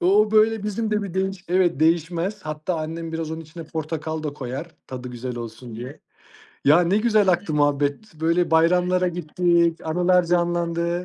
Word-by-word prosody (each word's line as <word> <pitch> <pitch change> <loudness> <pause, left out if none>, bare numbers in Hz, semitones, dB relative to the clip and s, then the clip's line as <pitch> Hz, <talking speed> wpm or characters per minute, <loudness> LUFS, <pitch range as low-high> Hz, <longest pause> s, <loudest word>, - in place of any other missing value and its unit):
O 205 +4 +4
böyle 220 0 +3
bizim 215 +1 -2
de 210 0 +1
bir 190 -3 -6
değiş 190 -1 -2
evet 175 -4 +2
değişmez. 170 +5 +1
Hatta, 155 +3 -3
annem 165 +1 -5
biraz 160 -1 -3
onun 160 0 -5
içine 165 +1 -10
portakal 160 0 -4
da 150 -2 -3
koyar, 140 +5 -6
tadı 125 -1 -7
güzel 125 0 -6
olsun 115 0 -8
diye. 125 +4 -8 0.6
Ya, 150 +5 +6
ne 175 +3 +2
güzel 215 -3 +3
aktı 175 -3 +1
muhabbet, 145 +6 0
böyle 165 +2 +1
bayramlara 180 +2 +3
gittik, 170 0 +1
anılar 180 +2 +3
canlandı. 170 0 0
170 Hz, 165 wpm, -23 LUFS, 155-180 Hz, 0.6 s, Ya